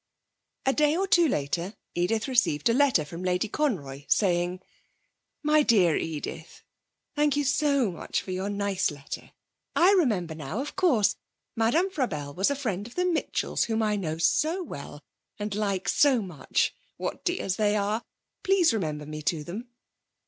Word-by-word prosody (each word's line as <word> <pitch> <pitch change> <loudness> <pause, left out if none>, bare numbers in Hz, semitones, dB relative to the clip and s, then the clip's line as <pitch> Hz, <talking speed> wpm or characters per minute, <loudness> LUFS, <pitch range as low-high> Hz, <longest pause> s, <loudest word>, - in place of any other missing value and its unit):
A 270 - +3
day 300 +2 +3
or 390 +1 0
two 345 -3 +5
later 170 - -2 0.2
Edith 215 +7 0
received 240 - +2
a - - +4
letter 260 - +3
from 170 +4 -8
Lady 180 +3 0
Conroy, 155 - -2
saying: 180 -2 +1 0.8
'MY 305 0 +4
DEAR 190 - +4
EDITH, 160 +1 -5 0.5
Thank 295 -1 +2
you 290 - +2
so 280 -4 +2
much 170 - -3
for 185 - -6
your 190 +2 -2
nice 200 -2 0
letter. 145 -2 -8 0.4
I 360 +3 +6
remember 215 - +2
now, 155 - -5
of 280 - -5
course, 260 - +3 0.4
Madame 295 +12 +2
Frabelle 150 - -2
was 190 +6 +2
a 280 - 0
friend 215 -7 -3
of 240 - -14
the 360 - +1
Mitchells, 340 -3 0
whom 225 -1 0
I 210 -1 +1
know 160 -6 -3
so 310 - +1
well, 145 - -9 0.3
and 210 0 -3
like 200 -2 -1
so 275 -4 +4
much. 170 -8 -1 0.2
What - - -4
dears 345 - -1
they 210 -1 +2
are! 210 +2 0 0.4
Please 385 - +3
remember 155 -8 -2
me 155 +1 -6
to 155 0 -1
them. 205 - -7
210 Hz, 165 wpm, -27 LUFS, 175-280 Hz, 0.8 s, I